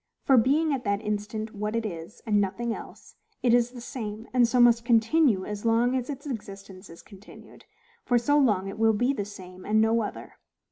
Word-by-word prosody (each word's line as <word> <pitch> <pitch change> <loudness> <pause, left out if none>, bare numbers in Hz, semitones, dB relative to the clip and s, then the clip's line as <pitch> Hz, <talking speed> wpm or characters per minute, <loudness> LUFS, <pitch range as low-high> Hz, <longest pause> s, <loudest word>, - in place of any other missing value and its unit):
For, 270 - +4
being 285 +6 +3
at 260 -2 -3
that 200 -1 0
instant 210 +1 -4
what 210 +2 -3
it 230 -1 -1
is, 170 -1 -8
and 210 -2 +2
nothing 225 +4 -2
else, - - -11 0.3
it 240 -2 +3
is 240 0 +3
the 245 0 -11
same, 220 -2 -6
and 245 -2 +4
so 250 +2 +1
must 235 -1 +5
continue 230 -2 +3
as 210 -1 -6
long 235 +2 +2
as 255 0 -3
its 280 0 -6
existence 195 -6 -8
is 165 - -13
continued; 200 0 -15 0.4
for 245 - +2
so 290 +5 +2
long 205 -8 +2
it 195 +2 -7
will 225 0 +4
be 245 +6 +1
the 205 -7 -3
same, 185 -2 -11
and 215 +1 +1
no 225 +1 +3
other. 210 - -7
225 Hz, 205 wpm, -26 LUFS, 205-245 Hz, 0.4 s, must